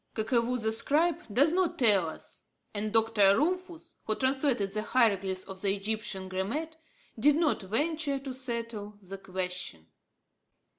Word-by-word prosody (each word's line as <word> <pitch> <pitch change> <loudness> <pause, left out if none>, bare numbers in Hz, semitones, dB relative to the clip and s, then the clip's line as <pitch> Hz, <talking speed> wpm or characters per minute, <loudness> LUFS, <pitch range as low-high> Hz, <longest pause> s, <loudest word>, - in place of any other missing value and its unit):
Kakevou 235 +2 +1
the 220 -1 0
scribe 305 +9 +3
does 285 +9 +4
not 365 -1 +1
tell 200 -9 +4
us, - - -10 0.3
and 215 0 -2
Dr. 220 -3 +4
Rumphius, 345 +1 -2
who 215 - 0
translated 260 -6 +1
the 215 - -1
hieroglyphs 195 -6 +1
of 190 -1 -9
the 200 -1 +1
Egyptian 205 -2 -3
grammat, 230 +13 -3 0.4
did 290 +5 +5
not 315 -5 +1
venture 285 - -1
to 270 -1 -6
settle 230 -5 -5
the 195 0 -9
question. 185 - -5
225 Hz, 140 wpm, -29 LUFS, 195-280 Hz, 0.4 s, did